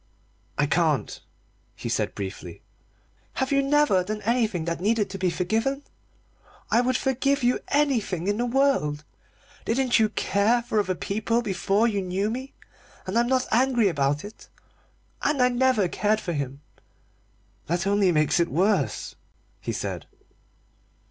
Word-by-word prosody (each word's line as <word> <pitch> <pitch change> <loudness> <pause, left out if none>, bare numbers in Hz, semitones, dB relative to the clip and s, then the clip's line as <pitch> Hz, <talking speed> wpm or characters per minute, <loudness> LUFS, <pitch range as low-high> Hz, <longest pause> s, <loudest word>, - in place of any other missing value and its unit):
"I - - +3
can't," - - 0 0.5
he - - -6
said - - -1
briefly. 95 -3 -7 0.7
"Have 265 +1 -2
you 275 0 +4
never 275 -9 +3
done 210 +3 -5
anything 220 -7 0
that 170 0 -3
needed 210 0 +1
to 195 - -6
be 185 -1 +1
forgiven? 225 +11 -1 0.9
I 235 - +5
would 250 0 +1
forgive 275 +1 0
you 245 +1 +2
anything 235 - 0
in 205 +1 +1
the 240 +1 0
world! 240 - +1 0.6
Didn't 250 +1 +2
you 220 -1 +3
care 215 +4 +1
for 220 -2 0
other 190 -3 0
people 220 +6 -1
before 200 +2 +1
you 205 -4 -1
knew 190 +3 -1
me? 260 +3 -6 0.5
And 185 - -4
I'm 235 +1 +3
not 260 0 +1
angry 240 -3 +3
about 145 0 0
it. 210 - -12 0.7
And 295 -2 0
I 250 0 +5
never 245 -5 +2
cared 210 +4 0
for 175 -5 -4
him." 140 -2 -4 1.1
"That 175 +3 -1
only 200 -2 +3
makes 155 +1 +2
it 170 - +2
worse," 190 +8 0 0.5
he - - -4
said. - - -4
215 Hz, 150 wpm, -25 LUFS, 185-250 Hz, 1.1 s, I